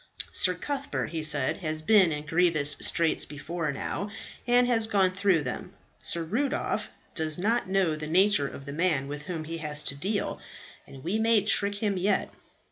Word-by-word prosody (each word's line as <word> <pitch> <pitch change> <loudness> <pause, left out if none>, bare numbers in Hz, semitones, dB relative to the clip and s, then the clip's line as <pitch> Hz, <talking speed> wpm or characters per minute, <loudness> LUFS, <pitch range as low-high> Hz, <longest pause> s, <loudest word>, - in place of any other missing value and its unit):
"Sir 180 -1 +4
Cuthbert," 280 - -3
he 165 -2 -3
said, 150 -4 0
"has 155 -3 -3
been 190 -2 +5
in 150 0 -4
grievous 160 -2 +2
straits 165 -2 +1
before 155 +2 -4
now, 195 +8 -4 0.4
and 245 +1 +5
has 230 -3 +2
gone 195 -4 +3
through 185 -4 +2
them. 125 - -5 0.3
Sir 170 - 0
Rudolph 255 - -1 0.2
does 155 -2 0
not 215 +2 0
know 190 -5 +2
the 155 0 -6
nature 185 -2 +4
of 135 - -9
the 140 - -6
man 155 -4 +1
with 145 +1 -5
whom 165 0 -5
he 165 +1 -5
has 150 -1 -1
to - - -1
deal, 195 +8 -2 0.5
and 135 -1 -12
we 195 +6 -1
may 225 -2 +4
trick 205 -1 +2
him 205 -2 0
yet." 195 +2 0
175 Hz, 180 wpm, -28 LUFS, 155-205 Hz, 0.5 s, been